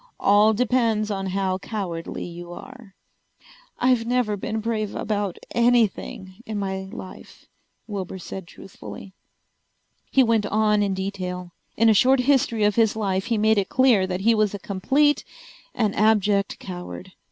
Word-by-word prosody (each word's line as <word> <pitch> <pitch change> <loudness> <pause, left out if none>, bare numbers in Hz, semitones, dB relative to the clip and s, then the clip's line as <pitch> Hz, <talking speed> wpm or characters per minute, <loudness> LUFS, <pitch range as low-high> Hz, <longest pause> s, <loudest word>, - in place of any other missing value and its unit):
All 210 +2 +4
depends 225 -2 +1
on 195 -1 -3
how 190 0 -1
cowardly 185 -6 -5
you 175 0 -9
are." 225 +2 -12 0.8
"I've 250 -2 +2
never 245 -4 +1
been 215 +3 -3
brave 215 -2 -2
about 205 -4 -2 0.2
anything 230 -5 +1
in 215 -2 -5
my 190 -1 -3
life," 185 -5 -11 0.4
Wilbur 195 -3 -5
said 190 0 -8
truthfully. 195 +1 -11 1.0
He 265 - +4
went 225 -3 +2
on 210 0 +2
in 200 -2 0
detail. 185 -2 -4 0.3
In 230 - +4
a 220 - +6
short 255 +5 +4
history 250 -5 +2
of 210 +1 +2
his 225 -2 +3
life 195 -3 -1
he 230 -1 0
made 215 0 +3
it 195 - -2
clear 245 -8 +4
that 185 0 -3
he 230 +3 +4
was 215 -2 +1
a - - -3
complete 270 +11 +1 0.5
and 215 -4 +1
abject 205 -2 +2
coward. 180 0 -8
210 Hz, 150 wpm, -23 LUFS, 190-230 Hz, 1.0 s, a